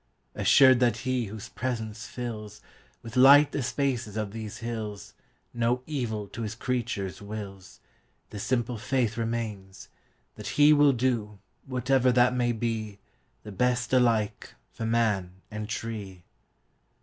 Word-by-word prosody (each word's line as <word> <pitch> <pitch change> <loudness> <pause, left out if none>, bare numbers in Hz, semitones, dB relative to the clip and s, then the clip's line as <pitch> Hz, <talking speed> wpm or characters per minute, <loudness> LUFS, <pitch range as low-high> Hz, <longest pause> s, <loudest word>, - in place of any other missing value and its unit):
Assured 130 -2 +6
that 120 -2 +2
He 130 -2 0
whose 110 +2 -8
presence 110 -4 -4
fillsWith 110 - -9
light 140 +3 +7
the 145 - -2
spaces 120 -4 -2
of 105 -2 -2
these 110 -1 -7
hillsNo 115 +2 -4
evil 115 -9 -3
to 115 - -7
His 110 0 -4
creatures 115 -7 -3
wills, 100 -2 -8 0.5
The 105 - -6
simple 120 0 -1
faith 125 -2 0
remains, 110 -4 -4 0.5
that - - -6
HeWill 145 -2 +6
do, 115 -4 -1 0.3
whatever 130 0 +2
that 125 0 +4
may 120 -1 +1
be, 110 -3 -3 0.5
The 105 - -9
best 125 +5 0
alike 115 -5 +1 0.2
for 115 - -5
man 105 -6 +1 0.2
and 105 0 -5
tree. 105 -5 -5
115 Hz, 125 wpm, -27 LUFS, 105-125 Hz, 0.5 s, light